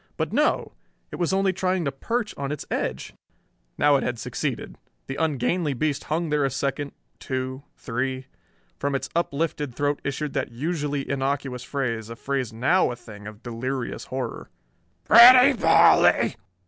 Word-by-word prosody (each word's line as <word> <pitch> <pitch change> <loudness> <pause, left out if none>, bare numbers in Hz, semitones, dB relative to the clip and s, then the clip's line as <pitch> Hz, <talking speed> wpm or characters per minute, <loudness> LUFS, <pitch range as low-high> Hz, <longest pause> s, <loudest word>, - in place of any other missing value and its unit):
But - - -2
no: - - +1 0.4
it - - -6
was 175 0 0
only 190 0 +2
trying 185 -1 -1
to 140 - 0
perch 230 - -3
on 140 0 -4
its 150 - -5
edge! 65 +1 -3 0.6
Now 145 -1 +4
it - - -2
had 120 -1 -2
succeeded. 125 +2 -4 0.3
The 135 - -6
ungainly 150 +1 0
beast 145 +2 -1
hung 160 0 -2
there 150 -1 +2
a 135 - +2
second, 140 +2 -3 0.3
two, 130 0 -4 0.2
three. 130 +2 -3 0.5
From 140 0 -1
its 135 - -3
uplifted 150 -5 -1
throat 145 +1 -1
issued 140 +1 -3
that - - -2
usually 145 +1 -3
innocuous 135 -2 -2
phrase, 115 -5 -3
a 115 - -7
phrase 135 -1 -3
now 130 +12 +2
a 120 - -4
thing 105 -3 -12
of 105 +1 -11
delirious 125 +2 -4
horror: 130 0 -5 0.5
"Pretty 250 +4 +9
Polly!" 225 - +5
140 Hz, 155 wpm, -24 LUFS, 125-155 Hz, 0.6 s, Pretty